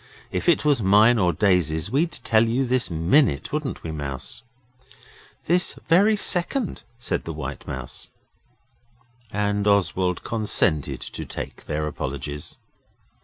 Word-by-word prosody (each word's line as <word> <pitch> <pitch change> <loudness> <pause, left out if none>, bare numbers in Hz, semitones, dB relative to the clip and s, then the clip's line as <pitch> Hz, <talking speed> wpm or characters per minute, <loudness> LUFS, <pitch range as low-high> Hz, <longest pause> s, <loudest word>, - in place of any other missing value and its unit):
If - - 0
it 155 -3 +3
was 145 -5 +3
mine 105 +4 +5
or 90 -3 +3
Daisy's 90 -3 +1
we'd 160 +6 +1
tell 115 0 +2
you 125 +4 +1
this 125 -7 +1
minute, 85 - +2
wouldn't 150 -2 -3
we, 80 - -4
Mouse?' 70 - -6 1.0
'This 180 +2 +2
very 200 +6 +5
second,' 205 +4 -1 0.2
said 95 -7 -2
the 80 - -4
White 75 0 -7
Mouse. 65 -1 -7 1.2
And 100 0 0
Oswald 95 -3 +1
consented 105 -9 0
to - - -6
take - - -7
their 75 0 -2
apologies. 70 0 -5
100 Hz, 125 wpm, -24 LUFS, -, 1.2 s, mine